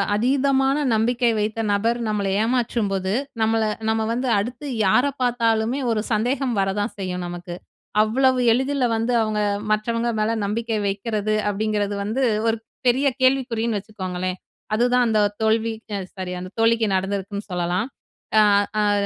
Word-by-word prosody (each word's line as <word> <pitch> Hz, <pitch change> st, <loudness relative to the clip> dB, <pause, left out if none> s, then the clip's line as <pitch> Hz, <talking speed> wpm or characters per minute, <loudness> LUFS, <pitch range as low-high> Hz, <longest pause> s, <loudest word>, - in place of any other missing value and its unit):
அதீதமான 270 Hz, +3 st, +2 dB, 0.2 s
நம்பிக்கை 240 Hz, +2 st, +2 dB
வைத்த 215 Hz, +2 st, -2 dB
நபர் 230 Hz, +4 st, +1 dB
நம்மளை 200 Hz, -2 st, 0 dB
ஏமாற்றும்போது, 220 Hz, -5 st, 0 dB, 0.3 s
நம்மள 225 Hz, 0 st, +2 dB, 0.3 s
நம்ம 220 Hz, 0 st, +1 dB
வந்து 250 Hz, +2 st, -2 dB
அடுத்து 245 Hz, +8 st, -5 dB, 0.2 s
யார 245 Hz, +8 st, +4 dB, 0.2 s
பார்த்தாலுமே 235 Hz, 0 st, +1 dB
ஒரு 220 Hz, -2 st, 0 dB
சந்தேகம் 250 Hz, +4 st, 0 dB
வர 195 Hz, 0 st, +1 dB
தான் 205 Hz, -, -3 dB
செய்யும், 180 Hz, -1 st, -3 dB
நமக்கு. 175 Hz, 0 st, -7 dB, 0.5 s
அவ்வளவு 255 Hz, +4 st, +2 dB
எளிதில 265 Hz, +2 st, +1 dB
வந்து 225 Hz, +2 st, 0 dB
அவங்க 215 Hz, -1 st, -1 dB, 0.3 s
மற்றவங்க 230 Hz, +2 st, 0 dB
மேல 215 Hz, +1 st, +1 dB
நம்பிக்கை 225 Hz, +2 st, -1 dB
வைக்கிறது, 210 Hz, +1 st, -1 dB, 0.2 s
அப்படிங்கிறது 205 Hz, 0 st, -1 dB
வந்து, 225 Hz, +6 st, -1 dB, 0.2 s
ஒரு 225 Hz, 0 st, +2 dB, 0.3 s
பெரிய 265 Hz, +4 st, +3 dB
கேள்விக்குறின்னு 240 Hz, -4 st, +1 dB
வச்சுக்கோங்களேன். 185 Hz, -3 st, -4 dB, 0.4 s
அதுதான் 245 Hz, +2 st, +3 dB
அந்த 220 Hz, -1 st, +2 dB, 0.2 s
தோல்விக்கு 220 Hz, 0 st, 0 dB
அ, -, -, -4 dB
சாரி 185 Hz, -2 st, -5 dB
அந்த 185 Hz, 0 st, -8 dB
தோழிக்கு 225 Hz, 0 st, +3 dB
நடந்திருக்குன்னு 200 Hz, +1 st, -3 dB
சொல்லலாம். 180 Hz, +5 st, -1 dB, 0.5 s
அ -, -, +7 dB, 0.4 s
அத 205 Hz, -1 st, +2 dB
220 Hz, 135 wpm, -22 LUFS, 205-240 Hz, 0.5 s, அ